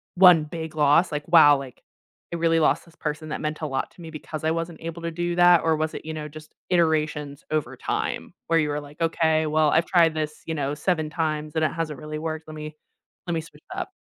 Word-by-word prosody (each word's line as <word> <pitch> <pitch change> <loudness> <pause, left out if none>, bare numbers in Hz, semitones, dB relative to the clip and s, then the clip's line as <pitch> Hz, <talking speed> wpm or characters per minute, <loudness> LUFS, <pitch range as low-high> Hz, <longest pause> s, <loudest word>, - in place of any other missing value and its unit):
1 180 -3 +7
big 160 0 -6
loss? 150 +4 +4
Like, 150 +1 -4
"Wow, 155 -4 +7
like, 135 -2 -9 0.5
I 170 - -1
really 165 0 +2
lost 155 +2 +2
this 170 0 -20
person 155 +1 -4
that 150 - -4
meant 150 0 -3
a - - -1
lot 135 -1 -3
to - - -16
me 165 - -8
because 155 0 -7
I 160 - +2
wasn't 165 0 -4
able 165 +1 -6
to 170 - -2
do 175 +1 -2
that," 175 -1 +7
or 160 -1 +3
was 155 0 -2
it, - - -7
you 160 - -4
know, 150 -1 -5
just 155 +1 -12 0.2
iterations 155 -4 0
over 155 -2 -1
time - - -3
where 165 0 +3
you 150 - +1
were 145 0 -1
like, 145 +2 -14
"Okay, 160 -1 +2
well, 155 0 +3
I've 165 +1 +3
tried 165 -3 +4
this, 155 -1 -4
you 160 - -3
know, 145 -1 -1
7 155 0 0
times 155 -1 -2
and 160 - +1
it - - 0
hasn't 155 -4 -3
really 155 0 -6
worked, 160 0 -4
let 155 - -8
me 155 0 -7 0.5
let 175 - -1
me 160 - -1
switch 165 - -17
it - - -8
up." - - -5
155 Hz, 250 wpm, -24 LUFS, 150-165 Hz, 0.5 s, 1